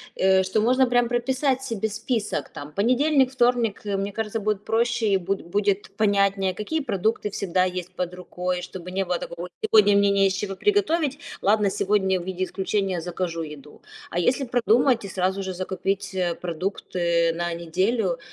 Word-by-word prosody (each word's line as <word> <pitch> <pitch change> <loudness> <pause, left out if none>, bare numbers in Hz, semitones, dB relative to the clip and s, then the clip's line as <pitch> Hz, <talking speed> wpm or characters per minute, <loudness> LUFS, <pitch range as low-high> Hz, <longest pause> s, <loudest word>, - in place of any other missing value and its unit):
э, 190 0 +4
что 190 +3 0
можно 255 +3 +4
прям 245 -1 +2
прописать 260 +2 0
себе 225 -4 -2
список. 215 - -2
Там, 145 +1 -9
понедельник, 255 - +3
вторник, 240 -4 +1
э, 200 -1 -1
мне 200 +1 -2
кажется, 220 +1 -2
будет 210 -1 -1
проще 235 +1 +1
и 200 -2 +4
бу 190 +2 -1
будет 200 +3 -1
понятнее, 200 -2 +2
какие 260 - -2
продукты 215 -3 -1
всегда 185 -2 0
есть 180 -1 -3
под 180 -1 -3
рукой, 180 0 -3
чтобы 180 0 -8
не 195 +1 0
было 180 -1 0
такого: 170 +1 -6
"Ой, 180 - -10 0.2
сегодня 205 -2 +5
мне 200 0 +4
не 195 0 +4
из 190 - 0
чего 195 0 -3
приготовить, 335 - +1 0.2
ладно, 205 0 +3
сегодня 190 -2 +1
в - - -8
виде 185 0 -3
исключения 190 -1 -1
закажу 175 -1 -3
еду". 150 -2 -10 0.3
А 175 - -1
если 250 +10 +2
продумать 245 0 +3
и - - -5
сразу 190 +1 -1
же 190 -1 -4
закупить, 195 +2 -3
э, 180 -2 0
продукты 170 -1 -1
на 175 +1 -2
неделю, 180 +3 0
195 Hz, 175 wpm, -24 LUFS, 180-225 Hz, 0.3 s, сегодня